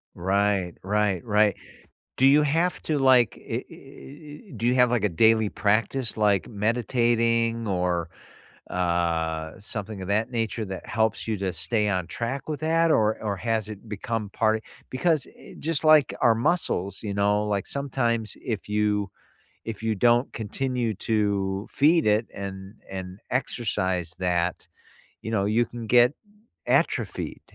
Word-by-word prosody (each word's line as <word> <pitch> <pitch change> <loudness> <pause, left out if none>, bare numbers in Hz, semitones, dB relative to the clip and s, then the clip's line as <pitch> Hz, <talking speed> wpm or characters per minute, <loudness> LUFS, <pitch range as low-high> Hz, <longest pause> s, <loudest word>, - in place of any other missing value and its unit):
Right, 95 -1 +1
right, 105 -1 0
right. 105 -2 +3 0.6
Do 130 - +4
you 145 +2 +6
have 165 +5 +1
to, 155 -2 0
like, 130 -5 +4
eh - - -3
eh - - -12
eh 150 +1 -12
eh - - -12
do 115 - -3
you 125 - +3
have, 125 -1 +5
like, 115 -4 +1
a 105 - +3
daily 110 +4 +3
practice, 110 +4 0
like 105 -3 +2
meditating 115 +1 +1
or, 90 -3 -1 0.6
uh 85 -3 -1
something 105 0 -5
of - - -6
that 110 +4 +1
nature 115 -2 -2
that 95 -2 -7
helps 110 +3 0
you 110 - 0
to 95 -2 -2
stay 105 +6 0
on 90 -4 -1
track 120 - -4
with 150 -2 -3
that, 165 +1 +2
or 110 -3 +2
or 105 -2 -2
has 110 +1 -1
it 105 +1 -10
become 105 0 -4
part 110 0 +1 0.3
because, 150 +1 +1
eh, - - -14
just 160 -1 0
like 155 -3 +5
our 115 -2 +5
muscles, 115 - 0
you 105 -2 -3
know, 105 +1 +2
like, 100 -2 -1
sometimes 120 -5 -2
if 110 -4 -4
you 105 -1 0 0.5
if 110 -1 -6
you 110 -1 +1
don't 120 +5 +3
continue 120 +1 -2
to 100 -2 -1
feed 160 0 +3
it 105 +2 +3
and 95 +1 -7 0.2
and 95 0 -7
exercise 95 -9 -1
that, 90 -1 -1 0.6
you - - -6
know, 100 -3 +1
you 115 +3 +2
can 120 -2 -8
get 125 +3 +5 0.5
atrophied, - - 0
110 Hz, 155 wpm, -25 LUFS, 100-120 Hz, 0.6 s, you